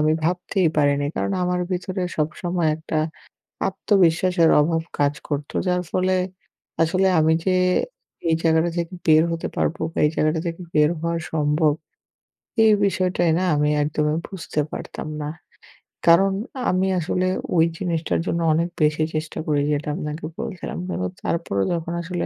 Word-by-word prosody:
আমি 155 +1 +3
ভাবতেই 180 +1 +1
পারিনি। 145 -1 +2
কারণ - - -1
আমার 180 0 0
ভিতরে 185 +1 -2
সবসময় 170 +2 -1
একটা 155 0 -3 0.7
আত্মবিশ্বাসের 185 -3 +3
অভাব 165 +2 +1 0.2
কাজ 145 0 +3
করতো, 145 -1 -4
যার 180 0 +2
ফলে 185 0 +2 0.7
আসলে 185 +4 +3
আমি 160 +1 +4
যে 185 -1 +3 0.7
এই 160 - +4
জায়গাটা 160 +1 +3
থেকে 170 +1 -2
বের 155 0 +6
হতে 165 0 -2
পারবো 165 - -1
বা - - -10
এই - - +4
জায়গাটা 155 +1 +1
থেকে 165 +2 -5
বের 150 -1 +4
হওয়া 170 +1 -1 0.2
সম্ভব, 150 0 +2 0.9
এই 220 - +6
বিষয়টাই 180 -3 +1
না - - 0
আমি 150 0 +2
একদমই 150 +1 0
বুঝতে 170 -5 -3
পারতাম - - -6
না। 150 - -3 0.8
কারণ 180 +4 +6 0.4
আমি 185 +1 +2
আসলে 180 +2 0 0.3
ওই 165 - +6
জিনিসটার 170 -3 -1
জন্য 170 - -1
অনেক 165 +2 +1
বেশি 155 +1 +3
চেষ্টা 155 +1 -3
করি, 145 -2 +2
যেটা 145 +1 -2
আপনাকে 150 -2 -5
বলছিলাম। 220 -6 -5
কিন্তু 90 - -2 0.2
তারপরও 130 - -1
যখন 170 0 -3
আসলে 175 0 -3
165 Hz, 150 wpm, -23 LUFS, 155-180 Hz, 0.9 s, বের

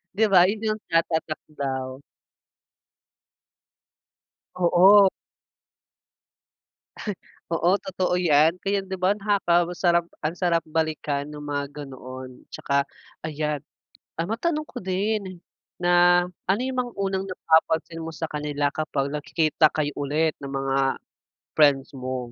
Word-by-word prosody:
'di 220 - +4
ba, 180 -1 +7
yun 215 +1 -1
yung 215 - -12
tatatak 160 -1 0 0.2
daw. 130 -2 -3 2.6
Oo. 185 +3 +6 2.4
Oo 170 +3 +3
totoo 185 -2 -1
yan 160 -2 +4
kaya 200 0 +1
'di 190 0 -5
ba? 185 +1 +2
Nakaka 195 -5 +2
sarap 170 -1 +2 0.2
ang 160 +3 -1
sarap 170 -2 +1
balikan 155 -3 -2
ng 150 0 -9
mga 145 -1 -2 0.2
ganoon, 130 -1 -10
'tsaka 140 0 -1 0.4
ayan. 150 -1 -2 0.5
Ah, 165 +4 -3
matanong 305 +6 -1
ko - - -11
din 190 -1 -2 0.4
na, 175 0 +5 0.2
ano 200 +4 +3
yung 260 0 -3
mga 245 - -9
unang 195 -1 -1
napapansin 165 -1 +1
mo 165 - -5
sa 160 0 -4
kanila 145 -1 -1
kapag 140 -2 -2
nakikita 155 +1 +2
kayo 150 -2 -2
ulit 150 +3 0
ng 140 - -6
mga 135 0 0 0.6
friends 140 -3 +4
mo? 130 0 -4
165 Hz, 120 wpm, -24 LUFS, 145-185 Hz, 2.6 s, ba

